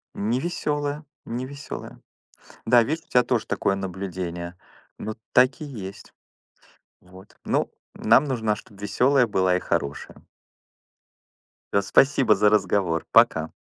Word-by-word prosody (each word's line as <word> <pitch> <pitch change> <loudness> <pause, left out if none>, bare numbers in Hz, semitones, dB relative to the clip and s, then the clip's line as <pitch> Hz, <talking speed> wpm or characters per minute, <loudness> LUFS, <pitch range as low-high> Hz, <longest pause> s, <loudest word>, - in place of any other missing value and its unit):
Не 115 +5 -1
весёлая 150 -2 -3 0.2
не 125 +2 -4
весёлая. 140 +1 -9 0.7
Да, 120 +1 +6
видишь, 155 +7 -3
у - - -38
тебя 125 - +4
тоже 120 -2 -1
такое 100 - 0
наблюдение. 90 -2 -5 0.4
Ну, 110 0 -5 0.2
так 130 +5 +4
и - - -5
есть. 100 -9 -9 0.9
Вот. 95 +2 -17
Ну, - - 0 0.2
нам - - +4
нужно, 115 -7 0
чтоб 105 -2 -15
весёлая 125 +6 +2
была 95 -3 +1
и - - -1
хорошая. 70 0 -4 1.5
Да. 100 - +4
Спасибо 130 +1 +4
за 105 +2 +4
разговор. 95 -6 +1
Пока. - - +4
110 Hz, 130 wpm, -24 LUFS, 95-130 Hz, 1.5 s, Да